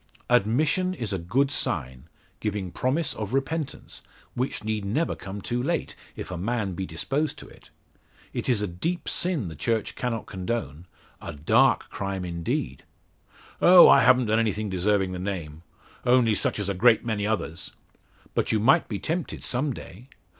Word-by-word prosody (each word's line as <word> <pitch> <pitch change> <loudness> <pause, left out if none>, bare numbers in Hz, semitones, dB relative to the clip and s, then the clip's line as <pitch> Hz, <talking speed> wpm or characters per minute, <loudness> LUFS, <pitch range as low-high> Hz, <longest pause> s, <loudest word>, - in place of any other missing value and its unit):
"Admission 145 - +2
is 115 - -3
a 95 - -1
good 130 +12 +1
sign 70 - -2 0.3
giving 100 -4 -3
promise 135 - 0
of 110 +3 -4
repentance, 140 +1 -3 0.3
which 125 -2 -3
need 110 -1 -2
never 135 +12 0
come 100 +1 -7
too 120 +1 -1
late 165 +6 -2 0.2
if - - -7
a 90 - -4
man 105 -1 -1
be 95 +1 -4
disposed 135 - -2
to - - -11
it. - - -17 0.6
It - - -3
is 110 -5 +2
a - - 0
deep 165 - -3
sin 170 - -1
the 80 - -7
Church 110 +9 -1
cannot 115 -3 -3
condone 95 -5 -4 0.3
a - - -6
dark 75 +1 +2
crime 95 -2 -3
indeed." 85 -6 -3 0.8
"Oh, 180 0 +9
I - - +7
haven't 130 -1 +5
done 110 +1 +2
anything 110 -2 -1
deserving 95 +1 +1
the 90 - -5
name. 85 -5 -5 0.4
Only 125 -3 +4
such - - 0
as 105 -2 -2
a 100 - 0
great 115 +5 +4
many 105 -3 -1
others." 100 -6 -3 0.6
"But - - 0
you 110 - +2
might 125 +6 +4
be 105 - -2
tempted 165 - -3
some 135 +4 -1
day. 115 0 -10
110 Hz, 170 wpm, -26 LUFS, 95-130 Hz, 0.8 s, Oh